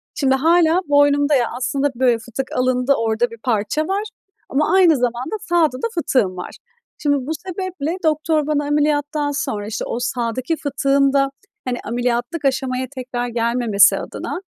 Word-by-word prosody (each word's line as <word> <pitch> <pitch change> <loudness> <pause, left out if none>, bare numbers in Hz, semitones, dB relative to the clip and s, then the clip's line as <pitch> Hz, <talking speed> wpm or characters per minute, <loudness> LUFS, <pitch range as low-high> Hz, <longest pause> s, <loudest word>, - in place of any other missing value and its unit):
Şimdi, 270 -3 +2
hâlâ 330 +4 +3
boynumda, 285 0 +4
ya, 245 -3 +3
aslında, 270 +3 0
böyle, 245 -1 +3
fıtık 245 +3 -5
alındı, 255 +1 +2
orada 230 +1 0
bir 230 - -10
parça 245 +6 0
var 395 +2 -1 0.5
ama 295 +3 +1
aynı 355 -5 +5
zamanda 245 - -2
sağda 330 -6 +1
da 270 - -1
fıtığım 235 - +1
var. 180 - -6 0.5
Şimdi, 285 -1 +1
bu 315 - -2 0.2
sebeple 365 -3 -3
doktor 310 -1 +1
bana 295 -1 +1
ameliyattan 290 0 0
sonra, 210 -7 -3
işte, 220 - -4
o 235 - -3
sağdaki 245 +4 -2
fıtığın 275 -1 +1
da, 275 -1 +3 0.4
hani, 250 -1 -2
ameliyatlık 245 +5 -2
aşamaya 260 -1 0
tekrar 250 -2 -4
gelmemesi 235 -3 +3
adına, - - -5
275 Hz, 155 wpm, -20 LUFS, 245-300 Hz, 0.5 s, aynı